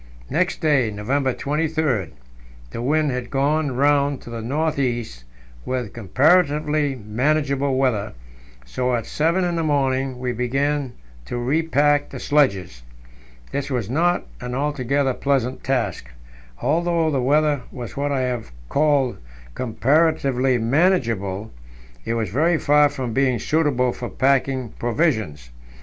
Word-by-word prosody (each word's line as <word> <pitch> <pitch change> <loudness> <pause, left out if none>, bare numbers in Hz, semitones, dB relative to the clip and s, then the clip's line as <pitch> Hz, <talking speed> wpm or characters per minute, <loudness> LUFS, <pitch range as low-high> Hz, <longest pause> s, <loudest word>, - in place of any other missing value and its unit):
Next 180 +2 0
day, 145 -8 +3
November 130 +7 -1
23, 150 - -1 0.6
the 115 - -5
wind 150 +3 +1
had 125 -1 -4
gone 140 0 0
round 140 0 +2
to 120 - -10
the 115 -1 -5
north 150 +6 -1
east, 120 - -2 0.4
with 125 -5 -3
comparatively 150 - +2
manageable 135 +5 0
weather, 115 -6 0 0.5
so 125 - -1
at 115 -2 -3
seven 170 +5 +1
in 175 -1 -1
the 165 - 0
morning 135 -3 0
we 125 0 -2
began 135 +2 -1 0.3
to 120 - -4
repack 145 +2 +1
the - - -7
sledges. 100 - +1 0.7
This 140 0 -3
was 120 -5 -2
not 175 +5 +1
an 125 0 -5
altogether 140 -1 0
pleasant 130 -2 -1
task; 115 - -1 0.5
although 165 +1 +1
the 135 -3 0
weather 145 +1 +2
was 120 -4 -8
what 145 +1 -1
I 135 -2 0
have 125 - -3 0.2
called 145 -4 +2 0.4
"comparatively 135 - +1
manageable," 115 - +1 0.5
it 115 - -1
was 110 -5 -2
very 160 - +2
far 150 -1 +4
from 130 -4 -4
being 130 -1 +2
suitable 140 -3 +1
for 120 - -6
packing 130 +2 +1
provisions. 110 - -1
135 Hz, 130 wpm, -22 LUFS, 120-150 Hz, 0.7 s, far